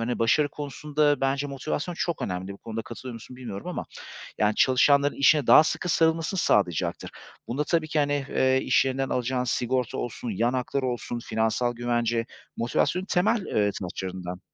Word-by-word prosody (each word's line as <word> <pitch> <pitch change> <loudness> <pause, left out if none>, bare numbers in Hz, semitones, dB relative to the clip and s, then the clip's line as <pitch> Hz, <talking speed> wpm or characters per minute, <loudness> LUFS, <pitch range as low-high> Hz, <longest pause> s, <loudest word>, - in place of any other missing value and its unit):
hani, 120 +1 -2
başarı 130 +6 +3
konusunda 145 0 -1
bence 135 +1 0
motivasyon 145 +5 -3
çok 170 -1 -2
önemli. 95 +1 -3
Bu 100 - -12
konuda 115 0 -5
katılıyor 120 +1 -8
musun, 115 +2 -11
bilmiyorum 120 -6 -7
ama. - - -4 0.5
Yani, 105 0 +2
çalışanların 140 +2 +4
işine 140 0 +4
daha 155 - +8
sıkı 175 - -2
sarılmasını 165 +3 +2
sağlayacaktır. 95 - +1 0.4
Bunda 140 +5 -1
tabii 155 0 0
ki 155 - -1
hani, 145 -1 0
eee, 130 -1 +2
iş - - +3
yerinden 135 0 -1
alacağın 125 +1 -1
sigorta 125 0 -1
olsun, 120 0 -4
yan 115 +4 0
haklar 130 +1 -2
olsun, 120 -1 -3
finansal 110 +1 0
güvence 120 -1 0 0.3
motivasyonun 145 +10 0
temel, 205 +3 +1
eee, 105 -1 +1
taşlarından. 90 0 -5
130 Hz, 160 wpm, -26 LUFS, 115-145 Hz, 0.5 s, daha